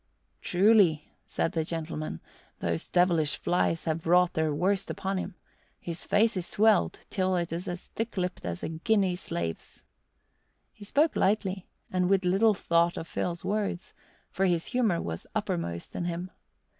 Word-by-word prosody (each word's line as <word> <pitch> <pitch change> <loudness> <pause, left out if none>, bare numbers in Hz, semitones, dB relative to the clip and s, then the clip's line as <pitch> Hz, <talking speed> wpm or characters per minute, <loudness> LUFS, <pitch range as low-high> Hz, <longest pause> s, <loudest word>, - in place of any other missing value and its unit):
"Truly," 185 -5 +3
said - - -1
the 160 - 0
gentleman, 155 - -4 0.4
"those 85 -1 -2
devilish 170 -4 +3
flies 165 -2 0
have 160 0 -2
wrought 180 +1 +4
their 160 -1 +1
worst 190 +6 0
upon 195 0 -2
him. 185 0 -5 0.4
His 170 0 -5
face 220 +2 +3
is 180 -2 -2
swelled 215 -2 +3
till 185 -2 +1
it 170 -2 -1
is 175 +3 -4
as 175 0 -5
thick 225 -1 -5
lipped 180 0 -2
as 85 0 -4
a - - -2
Guinea 185 +3 +1
slave's." 85 - -5 0.9
He 210 - -13
spoke 295 +9 +2
lightly 190 -2 0 0.2
and 180 -1 +1
with 195 -1 +3
little 200 +4 +4
thought 170 -1 +2
of 165 - -5
Phil's 175 -1 -3
words, 200 -3 -2 0.4
for 195 - +1
his 170 -2 +1
humour 225 -9 +1
was 80 0 -5
uppermost 85 0 -3
in 175 - -2
him. 175 +2 -4
180 Hz, 155 wpm, -28 LUFS, 165-195 Hz, 0.9 s, wrought